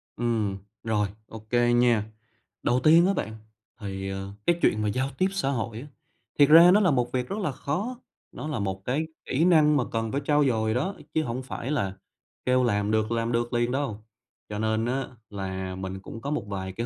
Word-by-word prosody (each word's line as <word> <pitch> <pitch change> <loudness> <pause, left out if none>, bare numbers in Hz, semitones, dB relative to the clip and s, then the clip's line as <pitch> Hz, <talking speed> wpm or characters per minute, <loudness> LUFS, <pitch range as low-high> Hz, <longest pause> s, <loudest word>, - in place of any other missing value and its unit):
Ừm, 110 -4 -1 0.3
rồi 105 -2 +1 0.2
OK 110 -1 -12 0.2
nha. 120 -3 +4 0.6
Đầu 125 - +2
tiên 165 +3 +7
á 195 - +2
bạn, 110 - -3 0.4
thì, 95 -2 -5
ờ, 95 0 -5
cái 175 0 +2
chuyện 110 - +3
mà 105 - 0
giao 130 +5 -1
tiếp 185 - +3
xã 195 -8 -1
hội 115 -4 -2
á, 145 - -10 0.5
thiệt 145 0 +7
ra 170 +3 +9
nó 200 - +6
là 185 -6 +3
một 125 -3 0
việc 125 -1 -1
rất 200 - -3
là 185 -8 -1
khó, 195 - -3 0.3
nó - - -6
là 150 -6 -2
một 95 -1 -3
cái 150 +6 -1 0.2
kỹ 150 +6 +2
năng 155 -4 +5
mà 130 - +2
cần 115 -1 -2
phải 140 - -1
trau 150 0 +3
dồi 110 -4 +1
đó, 170 +11 -1 0.2
chứ 160 - +2
hổng 125 0 -4
phải 130 0 -5
là 100 -10 -1 0.5
kêu 125 0 +3
làm 105 -3 +1
được 110 +1 +1
làm 115 0 0
được 120 +1 -1
liền 120 0 +1
đâu. 120 -6 -3 0.4
Cho 105 - -4
nên 110 +1 0
á 130 +2 -1 0.2
là 95 -2 -4
mình 95 0 -5
cũng 115 +3 -9
có 140 +4 -3
một 150 - -1
vài 95 -2 -4
cái 115 +4 -3
120 Hz, 215 wpm, -26 LUFS, 105-145 Hz, 0.6 s, ra